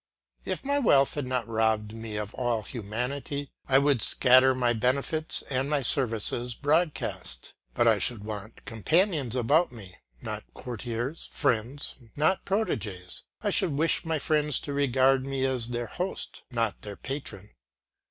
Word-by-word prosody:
If - - -3
my 285 +1 +2
wealth 140 - +4
had 145 -3 -3
not 125 -2 -1
robbed 110 -1 +1
me 115 -1 -6
of 105 0 -4
all 120 -4 -1
humanity, 125 +6 -4 0.2
I 135 - +5
would 140 -4 +3
scatter 130 +3 +5
my 120 -2 +2
benefits 140 +7 0
and 135 +1 -1
my 145 -2 +1
services 120 -2 0
broadcast, 150 - -1 0.2
but 120 - +3
I 110 -2 +5
should 110 -2 0
want 105 0 -7
companions 145 - +1
about 145 +8 +3
me, 100 -6 -11 0.2
not - - -5
courtiers, 120 +4 -4
friends, 125 +5 -1 0.2
not 155 +6 +2
proteges; 105 - -2 0.2
I - - +1
should 155 - +2
wish 160 +5 +1
my 160 -1 0
friends 150 -1 +2
to 145 - -5
regard 135 -1 +3
me 135 -1 0
as 130 -3 0
their 120 0 -3
host, 180 +9 -4
not 115 -4 -1
their 105 -1 -7
patron. 110 -8 -6
130 Hz, 150 wpm, -28 LUFS, 115-145 Hz, 0.2 s, I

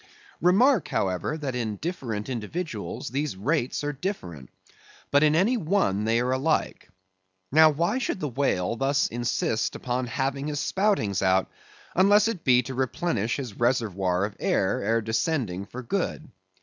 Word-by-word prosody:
Remark, 195 - +4
however, 95 - -1
that 140 -4 -4
in 115 -4 -2
different 120 - -4
individuals 120 - -4
these 140 0 -2
rates 130 - -1
are 145 0 -2
different; 95 - -5 0.6
but 145 - +5
in 155 0 +4
any 210 +9 +3
one 155 - +1
they 115 +1 +2
are 125 +1 0
alike. 140 +5 -1 0.6
Now, 155 +2 +7
why 170 - 0
should 230 - -2
the 150 - -2
whale 115 -7 0
thus 140 +3 +2
insist 115 -1 -1
upon 125 0 -2
having 135 +3 -2
his 145 -1 -2
spoutings 190 - +1
out, 95 0 +2 0.4
unless 205 +3 +5
it 220 -8 -3
be 125 -2 +4
to 130 - -6
replenish 130 - -1
his 125 -8 -6
reservoir 100 -7 +1
of 105 - -7
air, - - +1
ere 115 0 +1
descending 110 - -1
for 130 +1 -8
good? 160 +2 -2
130 Hz, 150 wpm, -26 LUFS, 110-160 Hz, 0.6 s, Now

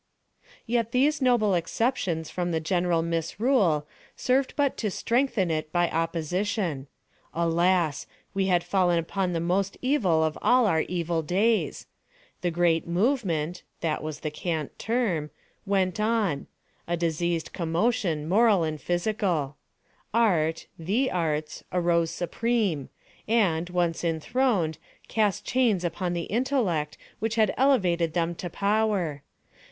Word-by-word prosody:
Yet 230 -1 0
these 290 +4 +2
noble 240 -6 +3
exceptions 175 - -1
from 175 -1 -2
the 165 -2 0
general 175 0 +1
misrule 170 - +1 0.3
served 260 +1 +1
but 285 -2 +1
to 215 - -1
strengthen 230 -4 0
it 155 -1 -2
by 175 0 +1
opposition. 165 -1 -1 0.5
Alas! 170 -1 +1 0.3
we 195 -1 0
had 175 -2 +2
fallen 180 -3 +2
upon 180 +3 -1
the 165 - 0
most 185 +4 0
evil 205 - +2
of 155 -1 -1
all 245 +3 +4
our 160 -6 +3
evil 170 -2 -1
days. 205 +8 +1 0.6
The 175 - +1
great 170 -1 +1
"movement"—that 175 - -1
was 155 -1 -6
the 155 - -3
cant 155 -2 -4
term—went 195 -2 -2
on: 210 -9 0 0.4
a 175 0 0
diseased 170 0 -1
commotion, 170 -2 0
moral 205 0 +4
and 155 -2 -3
physical. 175 - -1 0.6
Art—the 190 +3 +1
Arts—arose 170 +1 0
supreme, 195 - -1 0.4
and, 180 -7 +2
once 175 -2 0
enthroned, 170 - 0 0.3
cast 210 -5 0
chains 235 -8 +2
upon 175 +1 -2
the 170 -1 -2
intellect 215 - 0 0.2
which 220 0 -1
had 220 -3 +3
elevated 180 - +2
them 170 -1 0
to 175 +1 -6
power. 200 -6 0
175 Hz, 120 wpm, -26 LUFS, 165-220 Hz, 0.6 s, all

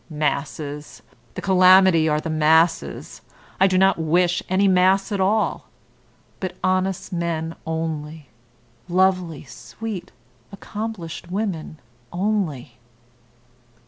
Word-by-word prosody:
Masses! 150 0 -4 0.3
The - - -6
calamity 185 -3 +5
are 150 0 +1
the 160 +1 -4
masses. 160 +2 +1 0.4
I 190 - +6
do 185 -1 +1
not 190 -1 +3
wish 175 +3 +2
any 190 +2 +3
mass 190 +2 +3
at 200 -2 -1
all, 195 - 0 0.7
but 185 -2 -5
honest 185 0 -1
men 165 -2 -2
only, 160 -2 -4 0.6
lovely, 180 -3 +1
sweet, 200 - -8 0.4
accomplished 200 -5 -7
women 185 -5 -3 0.3
only." 175 - -2
175 Hz, 100 wpm, -22 LUFS, 155-190 Hz, 0.7 s, I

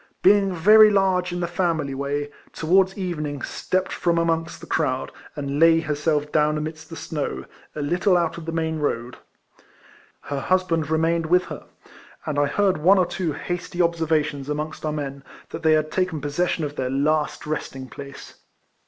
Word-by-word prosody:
being 195 0 +5
very 215 +5 +7
large 190 -3 +2
in 175 0 -3
the - - +1
family 165 -6 -1
way, 145 +2 -3 0.2
towards 190 +4 +2
evenincr 150 -7 -3
stepped 185 0 -2
from 170 -1 0
amongst 165 -1 0
the - - -10
crowd, 130 -5 -1 0.2
and 140 -1 -3
lay 165 0 +6
herself 150 -1 -1
down 150 0 +2
amidst 155 +1 -6
the 165 - -8
snow, 150 -3 -4 0.3
a 150 - -3
little 175 +5 +2
out 170 -2 0
of 170 - -8
the - - -2
main 160 -1 -1
road. 125 -4 -2 1.0
Her 140 -1 -4
husband 170 -2 0
remained 165 +1 +1
with 180 +2 +4
her: - - -9 0.6
and 145 -2 -1
I 145 - +3
heard 190 +3 +1
one 185 +6 +5
or 185 - +4
two 175 -2 -3
hasty 175 +3 -5
observations 160 -4 0
amongst 150 +1 -4
our - - 0
men. 140 -2 -5 0.3
that 165 - -7
they 160 -1 +4
had 155 0 +1
taken 180 -4 -1
pz^session 150 +3 -1
of 145 0 -7
their 130 -1 -1
last 150 +3 0
resting 135 -3 -4
place. 140 +1 -11
160 Hz, 170 wpm, -23 LUFS, 145-175 Hz, 1.0 s, very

